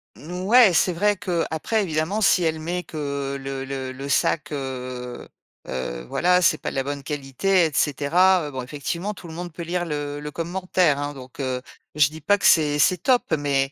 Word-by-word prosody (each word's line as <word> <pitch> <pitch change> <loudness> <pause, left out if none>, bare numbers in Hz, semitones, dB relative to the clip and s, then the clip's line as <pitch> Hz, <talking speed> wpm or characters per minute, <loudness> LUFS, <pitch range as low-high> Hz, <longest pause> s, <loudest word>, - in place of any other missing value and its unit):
N 160 - -11 0.2
ouais, 235 -4 +7
c'est 175 +3 +3
vrai 205 +4 +2
qu'après, 180 +3 -1
évidemment, 165 +4 -1
si 190 -3 +4
elle 160 -1 0
met 175 +3 -3
que 140 -3 -4
le 135 0 -5
le 135 -1 -5
le 135 +2 -7
sac, 150 +3 +1
heu 130 -3 -5 0.4
heu, 65 -2 -4
voilà, 180 - +3
c'est 160 - +4
pas - - -4
de - - -9
la 135 - 0
bonne 140 0 -5
qualité, 150 +6 +1
et 160 - -1
cetera, 160 +5 +3
heu, - - -7
bon, 130 -2 -5
effectivement, 170 +9 -4
tout 185 - -12
le 160 - -9
monde 175 0 -6
peut 170 - -8
lire 175 +1 -2
le 145 -2 -4
le 150 0 -6
commentaire, 175 -2 0
hein. 145 0 -3
Donc, 130 -1 -12
heu, 130 -2 -2 0.3
je 150 -2 +5
dis 160 +1 -11
pas 205 +7 +3
que - - -2
c'est 150 -3 +5
c'est 180 +5 +4
top, 245 +8 +2
mais, 140 -2 0
150 Hz, 205 wpm, -23 LUFS, 135-180 Hz, 0.4 s, ouais